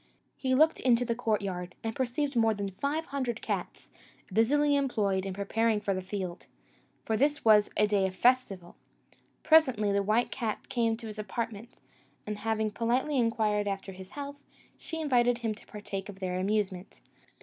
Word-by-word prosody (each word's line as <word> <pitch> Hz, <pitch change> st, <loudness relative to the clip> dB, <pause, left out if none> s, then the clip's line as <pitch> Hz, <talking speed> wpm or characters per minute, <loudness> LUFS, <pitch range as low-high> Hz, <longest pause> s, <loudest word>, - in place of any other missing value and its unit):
He 260 Hz, -1 st, 0 dB
looked 315 Hz, +4 st, +4 dB
into 245 Hz, -1 st, +3 dB
the 235 Hz, -, 0 dB
courtyard, 200 Hz, -6 st, -2 dB
and 225 Hz, -1 st, -3 dB
perceived 265 Hz, +2 st, -1 dB
more 225 Hz, -2 st, +3 dB
than 200 Hz, -1 st, -3 dB
five 285 Hz, -, -2 dB
hundred 250 Hz, -4 st, -1 dB
cats, -, -, -4 dB, 0.4 s
busily 290 Hz, +6 st, +3 dB
employed 205 Hz, -9 st, 0 dB
in 190 Hz, -, -3 dB
preparing 215 Hz, +2 st, +1 dB
for 200 Hz, -1 st, -1 dB
the 185 Hz, -, -2 dB
field 185 Hz, -2 st, -5 dB, 0.6 s
for 220 Hz, -, 0 dB
this 290 Hz, +4 st, +1 dB
was 210 Hz, -2 st, +6 dB
a 210 Hz, -, +5 dB
day 205 Hz, -2 st, +2 dB
of 185 Hz, -, -7 dB
festival. 200 Hz, -7 st, +1 dB, 0.7 s
Presently 260 Hz, -10 st, +4 dB
the 200 Hz, 0 st, +2 dB
white 215 Hz, +4 st, +1 dB
cat 225 Hz, -5 st, -4 dB
came 230 Hz, -2 st, +1 dB
to 230 Hz, -, -10 dB
his 215 Hz, -1 st, -7 dB
apartment; 225 Hz, +2 st, -5 dB, 0.4 s
and 210 Hz, 0 st, -4 dB
having 220 Hz, 0 st, 0 dB
politely 250 Hz, +6 st, 0 dB
inquired 215 Hz, -3 st, +1 dB
after 195 Hz, -1 st, -3 dB
his 190 Hz, 0 st, -11 dB
health, 285 Hz, 0 st, -5 dB, 0.4 s
she 325 Hz, -, -7 dB
invited 245 Hz, -5 st, +3 dB
him 230 Hz, -2 st, -2 dB
to 210 Hz, -, -16 dB
partake 205 Hz, -1 st, -6 dB
of 195 Hz, -1 st, -10 dB
their 185 Hz, -1 st, -2 dB
amusement. 195 Hz, -1 st, -2 dB
220 Hz, 170 wpm, -29 LUFS, 200-245 Hz, 0.7 s, was